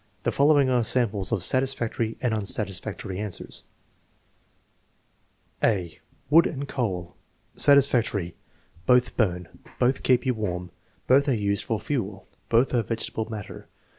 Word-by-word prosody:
The - - +1
following 145 -1 +4
are 125 -2 +2
samples 110 -5 +1
of 105 -6 0
satis 130 +5 +1
factory 115 -1 -3
and 125 -3 0
unsatisfactory 100 -2 -2
answers: 105 -3 -5 1.9
1 - - +4
(a) 90 -5 -6 0.3
Wood 165 +3 +7
and 140 -2 -5
coal 95 -11 -3 0.4
Satisfactory. 120 -10 +3 0.5
"Both 125 -1 +3
burn." 90 -6 0 0.3
"Both 125 +2 +1
keep 125 0 +2
you 130 - +2
warm." 90 -5 -4 0.3
"Both 140 +3 +4
are 130 - +2
used 100 -2 -1
for 110 -2 -1
fuel." 105 -6 -4 0.2
"Both 120 +4 +3
are 120 - +3
vegetable 110 -1 -4
matter." 105 -3 -8
115 Hz, 135 wpm, -25 LUFS, 100-130 Hz, 1.9 s, Wood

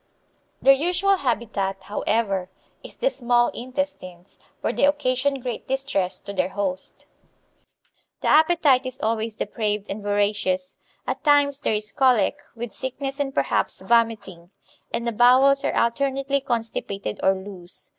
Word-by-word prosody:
Their 275 - +8
usual 360 +7 +2
habitat, 200 - -2
however, 205 -3 -1 0.3
is - - -10
the - - +1
small 240 - +2
intestines, 245 -9 -6 0.2
where - - -1
they - - -1
occasion 280 -1 +1
great 245 -2 -5
distress 265 -9 -1
to 200 - -7
their 185 -1 0
host. 190 -2 -3 1.2
The - - -2
appetite 305 -5 +4
is 255 0 -8
always 220 0 -1
depraved 210 -2 -2
and 205 +2 -5
voracious. 205 -2 0 0.3
At - - -3
times 285 -2 +4
there 220 - 0
is 210 0 -4
colic, 255 +1 +3 0.2
with 235 -2 -6
sickness 270 +2 -5
and 280 -1 -1
perhaps - - 0
vomiting, 220 -7 0 0.4
and 235 - -2
the 235 - 0
bowels 255 +5 +5
are - - 0
alternately 275 +3 0
constipated 225 - -3
or 190 - +3
loose. 190 -2 -9
235 Hz, 135 wpm, -23 LUFS, 200-275 Hz, 1.2 s, Their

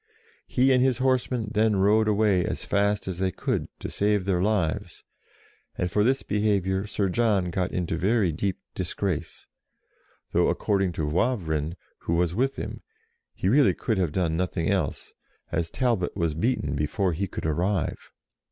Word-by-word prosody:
He 130 +1 +3
and 125 - +4
his 130 -3 +2
horsemen 125 -4 0
then 110 0 +3
rode 105 +3 +3
away 105 -3 +3
as - - -4
fast 100 0 +1
as 90 -2 -4
they 95 0 +1
could, - - -2
to - - -5
save 105 -2 +1
their 90 -2 +1
lives, 100 -2 -1 0.7
and 90 - -1
for 105 +3 +2
this 130 +4 +2
behaviour 100 -2 0
Sir 105 -1 0
John 100 -3 +1
got 90 +1 -1
into 85 -2 -2
very 100 0 +2
deep 95 +4 -2 0.2
disgrace, 85 -5 -3 0.9
though, - - +3
according 95 -3 0
to 80 - -2
Wavrin, 80 - 0 0.2
who 85 - -1
was 85 0 +1
with 130 +7 0
him, - - -6 0.5
he - - -2
really 135 +7 +4
could 110 -5 -1
have 90 -5 +1
done 85 -2 0
nothing 85 0 -1
else, 95 -7 -2 0.4
as 85 -1 -1
Talbot 115 -7 0
was 85 -4 0
beaten 80 - 0
before 85 +6 0
he 95 +5 -2
could - - -6
arrive. 85 +4 -1
95 Hz, 160 wpm, -26 LUFS, 85-110 Hz, 0.9 s, and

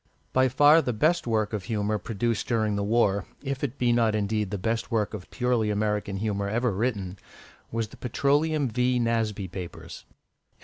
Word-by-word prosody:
By 130 0 +4
far 145 +5 +6
the 125 - -2
best 155 +7 +1
work 110 -2 0
of 100 -3 -3
humour 105 0 -1
produced 115 +1 -2
during 110 -3 +1
the 100 - -1
war, 100 -3 +2 0.2
if 135 -1 -3
it 140 -1 -2
be 120 -1 +2
not 115 -2 +2
indeed 105 -1 -1
the 100 - -3
best 115 +4 -2
work 110 -2 0
of 100 -4 -7
purely 125 -3 0
American 105 -1 -1
humour 100 -1 -1
ever 120 +3 +1
written, 100 -3 -2 0.5
was 115 -1 -2
the - - -14
Petroleum 145 +4 +1
V. 125 +2 +1
Nasby 115 -4 0
papers. 90 -1 -8
110 Hz, 175 wpm, -26 LUFS, 105-125 Hz, 0.5 s, far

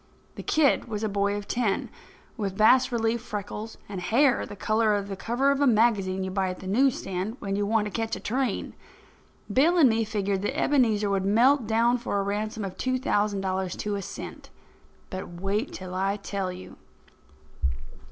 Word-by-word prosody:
The - - -7
kid 305 -3 +2
was 220 -2 -4
a - - +1
boy 200 0 0
of 205 0 -5
ten, 230 -5 0 0.5
with 195 -4 -3
bas 255 +4 +5
relief 230 0 0
freckles, 210 0 -6
and 195 -3 -5
hair 255 +7 +3
the - - -8
colour 215 +1 +2
of 200 0 -3
the 195 - -3
cover 245 +7 +1
of 280 - 0
the 285 - +4
magazine 210 -5 +2
you 190 - -3
buy 190 -1 0
at 185 - -5
the - - -11
news 250 +7 +3
stand 195 +4 -4
when 195 -4 -3
you 205 0 0
want 220 0 +2
to 210 - -4
catch 225 +1 -2
a - - -7
train. 250 -1 -2 0.8
Bill 325 - +4
and 310 -6 +7
me 225 0 +2
figured 200 -3 -1
that 265 +8 -2
Ebenezer 220 -9 +2
would 195 -1 +1
melt 235 +5 +4
down 235 +2 +3
for 220 -4 -2
a - - 0
ransom 210 +1 -2
of 190 -1 -7
two 255 0 0
thousand 205 -6 0
dollars 190 -1 -2
to 210 - -3
a 200 - -3
cent. - - -8 0.6
But 185 -3 -6
wait 205 +7 -1
till 185 -1 -7
I 195 +2 0
tell 200 -2 -3
you. 180 +1 -10
210 Hz, 195 wpm, -26 LUFS, 195-235 Hz, 0.8 s, and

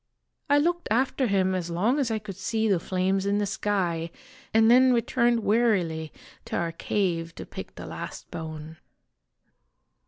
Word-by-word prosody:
I 285 - +5
looked 345 +4 +1
after 260 +3 +1
him 190 -2 +2
as 180 -2 -2
long 210 - +1
as 265 -4 +1
I 225 - 0
could 210 -3 -7
see 220 +4 -1
the 195 -4 +3
flames 190 +2 0
in 200 0 +2
the 205 - +1
sky, 180 -5 -1 0.4
and 225 +1 +5
then 255 +1 +6
returned 235 0 +2
wearily 195 -8 +1 0.3
to - - -4
our 170 -1 -1
cave 165 -2 -2
to - - -7
pick - - -9
the - - -8
last - - -8
bone. 160 0 -7
200 Hz, 160 wpm, -26 LUFS, 170-235 Hz, 0.4 s, then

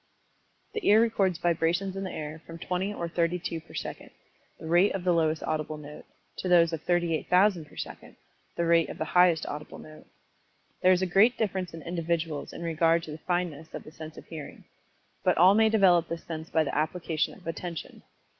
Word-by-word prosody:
The 440 -3 -4
ear 210 +2 +7
records 200 -6 +2
vibrations 175 +3 0
in 195 - -4
the 185 - -4
air 155 +1 -6
from 165 - -8
20 185 +3 -2
or 170 -5 -4
32 170 0 -1
per - - -15
second, - - -6 0.5
the - - -9
rate 175 +5 +3
of 190 - -4
the 180 -1 +3
lowest 160 -1 +1
audible 155 0 -2
note, 150 0 -11 0.3
to 185 - -3
those 170 -2 +5
of 160 - -3
38,000 175 +1 +2
per - - -19
second, - - -8 0.4
the 170 - +1
rate 165 -1 +3
of - - -7
the 155 - -2
highest 180 -2 +4
audible 150 +1 -7
note. 155 0 -13 0.7
There 185 - +5
is 185 0 +3
a - - +3
great 200 +7 +4
difference 190 -4 -2
in 160 - -9
individuals 165 -3 -2
in - - -8
regard 165 0 +2
to 155 - -8
the 150 - -8
fineness 175 -3 -3
of - - -7
the 155 - -12
sense 155 -1 -10
of - - -11
Hearing. 155 -3 -9 0.6
But - - +2
all 180 +3 +7
may 220 +1 +4
develop 185 -6 +4
this 170 0 -5
sense 160 0 -7
by 160 - +2
the 145 - -4
application 160 +1 -1
of 185 - -18
Attention. 165 0 -6
170 Hz, 200 wpm, -28 LUFS, 160-180 Hz, 0.7 s, ear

